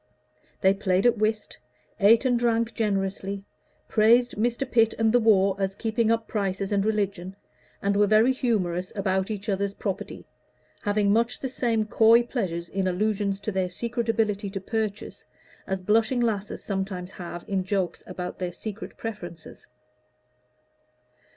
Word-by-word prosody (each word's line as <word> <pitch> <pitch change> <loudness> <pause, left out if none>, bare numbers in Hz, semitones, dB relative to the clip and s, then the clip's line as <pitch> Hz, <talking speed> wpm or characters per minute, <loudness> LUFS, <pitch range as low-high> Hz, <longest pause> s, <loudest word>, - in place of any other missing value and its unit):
They 190 -1 +5
played 195 0 0
at 240 -3 +4
whist, 215 0 -1 0.4
ate 225 +6 +5
and 245 -2 +3
drank 230 -1 +1
generously, 195 -2 -2 0.4
praised 235 +3 +4
Mr. 240 +5 0
Pitt 225 -3 +3
and 225 -1 +3
the 245 - +6
war 200 -4 +4
as 195 0 -1
keeping 225 +1 0
up 230 -1 +1
prices 195 -2 -2
and 200 -1 +2
religion, 200 -3 -1 0.5
and 200 0 +1
were 205 0 +4
very 220 +5 +5
humorous 185 -8 -1
about 190 -1 0
each 210 -1 -5
other's 200 0 -1
property, 195 -3 -5 0.6
having 205 -1 +2
much 235 +2 +1
the 265 - -3
same 230 -4 0
coy 230 +1 +5
pleasure 180 -9 -3
in 190 -1 0
allusions 200 +1 0
to 215 - -3
their 190 -2 -1
secret 235 +5 -3
ability 210 -3 0
to 195 0 -4
purchase, 215 +1 -4 0.4
as 190 -1 -3
blushing 220 +5 +2
lasses 215 -4 -2
sometimes 190 -2 -4
have 175 -2 -8
in 195 -2 0
jokes 190 -3 -2
about 180 -1 -6
their 180 -1 -2
secret 215 +3 -7
preferences. 175 -7 -8
205 Hz, 150 wpm, -26 LUFS, 190-225 Hz, 0.6 s, the